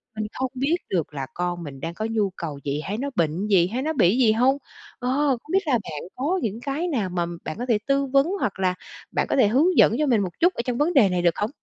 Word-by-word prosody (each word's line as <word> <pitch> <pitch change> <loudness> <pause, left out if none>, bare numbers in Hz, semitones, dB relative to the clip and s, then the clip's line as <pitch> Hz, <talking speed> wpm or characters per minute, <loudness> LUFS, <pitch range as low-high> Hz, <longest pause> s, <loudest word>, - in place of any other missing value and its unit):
Mình 215 0 -3
không 260 -1 -3
biết 280 +7 +1
được 165 -4 -1
là 135 -2 -4
con 175 -1 -3
mình 135 -3 -8
đang 165 +3 -4
có 215 - -4
nhu 210 -3 +1
cầu 150 -5 -5
gì, 145 +1 -2
hay 205 +5 -3
nó 280 +4 -2
bệnh 170 +5 0
gì, 185 -4 +4
hay 245 +6 -3
nó 315 +3 -1
bị 210 - +3
gì 235 -4 +5
hông? 255 +5 +3 0.4
Ờ, 250 0 -2 0.3
không 305 - -11
biết 385 -4 +2
là 275 - +2
bạn 160 -10 -2
có 320 +9 0
những 220 +1 -2
cái 290 +6 -2
nào 225 - -1
mà 175 -1 -1 0.2
bạn 155 - -5
có 245 - -2
thể 225 - +4
tư 275 0 +2
vấn, 275 +3 +3
hoặc 195 - -2
là 185 -1 +1 0.4
bạn - - 0
có - - +1
thể 255 -6 +5
hướng 300 - +3
dẫn 225 - +6
cho 305 - +2
mình 230 -5 +3
một 185 -3 -2
chút 355 +3 +4
ở - - -2
trong 245 -1 -1
vấn 325 +4 +1
đề 220 -8 +5
này 180 -1 0
được 170 -2 +3
không? 210 - -1
220 Hz, 280 wpm, -24 LUFS, 180-275 Hz, 0.4 s, dẫn